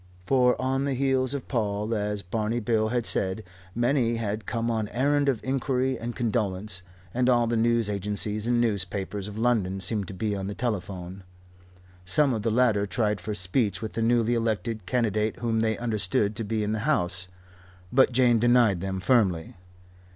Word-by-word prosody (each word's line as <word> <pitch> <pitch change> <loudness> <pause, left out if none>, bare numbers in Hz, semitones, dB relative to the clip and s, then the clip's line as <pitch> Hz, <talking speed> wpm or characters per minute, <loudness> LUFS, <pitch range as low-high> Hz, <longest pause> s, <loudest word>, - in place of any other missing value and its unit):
For, 125 +2 +3
on 135 +1 0
the 140 -2 -1
heels 130 0 +1
of 135 - -6
Paul, 105 -2 -1
as 105 -1 -2
Barney 110 +5 -1
Bill 110 -1 +1
had 120 0 -1
said, 95 +3 0 0.3
many 120 -1 +2
had 110 -1 -3
come 115 0 -1
on 110 -2 -1
errand 140 +5 +1
of 125 -5 -1
inquiry 130 0 0
and 120 +1 -5
condolence 105 -5 -1 0.3
and 125 +1 +2
all 120 -1 +4
the 115 0 0
news 115 -1 +2
agencies 105 +2 -3
and 120 0 +2
newspapers 100 -2 -2
of 105 0 -8
London 110 -5 +1
seemed 95 +1 -1
to 95 - -8
be 105 +1 -1
on 95 -1 -4
the 100 - -5
telephone. 95 -5 -4 0.8
Some 130 +10 +2
of 110 - -2
the 115 - 0
latter 110 -3 +2
tried 105 -2 0
for 105 +3 -4
speech 100 +2 0
with 110 - -5
the 115 - -2
newly 115 0 +2
elected 115 -3 -2
candidate 110 -3 0
whom 115 -2 -1
they 110 -1 +1
understood 105 -2 0
to 115 - -3
be 110 0 -1
in 105 - -1
the 110 - -1
house, 95 -9 +1 0.7
but 130 0 +5
Jane 120 -2 +4
denied 120 -6 +4
them 95 0 -3
firmly. 95 -8 +2
110 Hz, 180 wpm, -26 LUFS, 100-120 Hz, 0.8 s, but